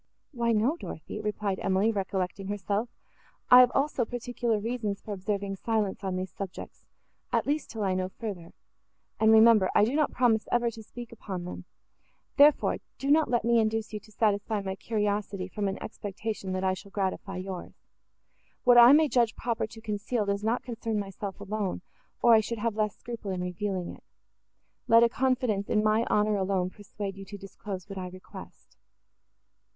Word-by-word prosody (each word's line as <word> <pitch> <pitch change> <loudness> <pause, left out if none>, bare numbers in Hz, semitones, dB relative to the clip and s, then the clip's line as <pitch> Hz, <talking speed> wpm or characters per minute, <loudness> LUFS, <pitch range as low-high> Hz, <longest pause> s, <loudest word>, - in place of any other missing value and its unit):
"Why, 235 -4 0
no, 230 +9 +2
Dorothée," 210 - -7
replied 210 -2 -2
Emily, 195 +4 +2
recollecting 195 -1 -3
herself, 205 +3 -2 0.6
"I 250 - +11
have 250 -1 +7
also 275 -2 +1
particular 240 -1 -2
reasons 215 -2 -3
for 210 - -6
observing 200 0 -3
silence, 215 -2 -1
on 190 -1 -2
these 185 0 -4
subjects, 195 -2 -8 0.4
at - - +1
least, 295 +1 -1
till 220 -2 -4
I 190 -1 +1
know 185 0 -1
further; 190 -5 -7 0.7
and, 220 0 +5
remember, 220 -3 +6
I 210 - +6
do 240 - -2
not 300 0 +2
promise 230 -3 +2
ever 240 -1 +2
to 225 - -10
speak 240 +2 -10
upon 195 -5 -6
them; 180 - -7 0.7
therefore, 290 0 +5 0.2
do 275 +1 -1
not 310 +1 +4
let 240 -2 +1
me 235 0 +4
induce 220 0 -1
you 210 - -3
to 215 - -20
satisfy 210 -1 0
my 190 -1 -4
curiosity, 205 -3 -2
from 200 +1 -3
an 195 - -2
expectation, 210 -2 -5
that 185 0 -2
I 190 0 +2
shall 200 +2 -9
gratify 195 -1 -3
yours. 185 -1 -6 0.9
What 245 -1 +7
I 240 +3 +10
may 310 +1 +6
judge 240 -5 +2
proper 230 -2 -2
to 225 0 -12
conceal, 210 +1 -2
does 200 0 -1
not 225 +3 0
concern 230 -2 -3
myself 200 0 -5
alone, 200 -2 -3 0.4
or 235 - +7
I 220 - +8
should 230 +2 -3
have 225 0 -1
less 210 -2 -1
scruple 230 -4 -7
in 185 -1 -2
revealing 180 0 -3
it: - - -16 0.8
let 230 +1 +7
a 235 - +5
confidence 250 -6 0
in 210 - +2
my 215 +2 +3
honour 210 0 +2
alone 190 -1 0
persuade 200 -1 -7
you 195 - -8
to 205 +1 -8
disclose 195 -1 -8
what 195 -1 -6
I 185 - -4
request." 185 +1 -12
210 Hz, 180 wpm, -28 LUFS, 195-230 Hz, 0.9 s, I